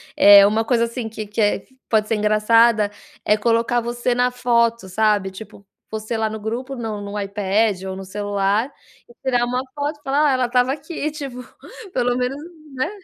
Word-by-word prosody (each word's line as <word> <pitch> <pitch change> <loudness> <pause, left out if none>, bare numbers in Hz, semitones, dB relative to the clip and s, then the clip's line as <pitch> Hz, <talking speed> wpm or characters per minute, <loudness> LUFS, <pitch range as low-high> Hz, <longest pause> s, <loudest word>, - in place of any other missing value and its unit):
eh, 200 0 +8
uma 215 +2 +2
coisa, 235 -1 +2
assim, 235 -1 -5
que 215 -1 -6
que 210 +2 -3
é 205 -2 +1 0.2
pode 215 -1 +2
ser 225 - 0
engraçada 215 +1 +3 0.3
é 210 - +4
colocar 230 +2 +1
você 240 +1 -1
na 245 +1 +2
foto, 235 -3 +1
sabe, 205 -1 +1
tipo, 200 0 -12 0.2
você 220 +1 -4
lá 220 0 0
no 220 0 -6
grupo 240 +6 -4
no 220 -4 -5
no 200 +1 -5
iPad 200 0 0
ou 190 0 -5
no 190 0 -8
celular, 205 +4 -1 0.4
e - - -16
tirar 245 -2 +1
uma 250 +1 -1
foto 290 +1 -3
e - - -34
falar: 290 +2 +2
"Ah, - - +2
ela 255 -1 +1
estava 250 +1 +2
aqui", 305 +1 -5
tipo, 275 -5 -7 0.5
pelo 245 -1 +1
menos, 250 +2 -2 0.4
né. 260 +5 -1
230 Hz, 190 wpm, -21 LUFS, 210-250 Hz, 0.5 s, eh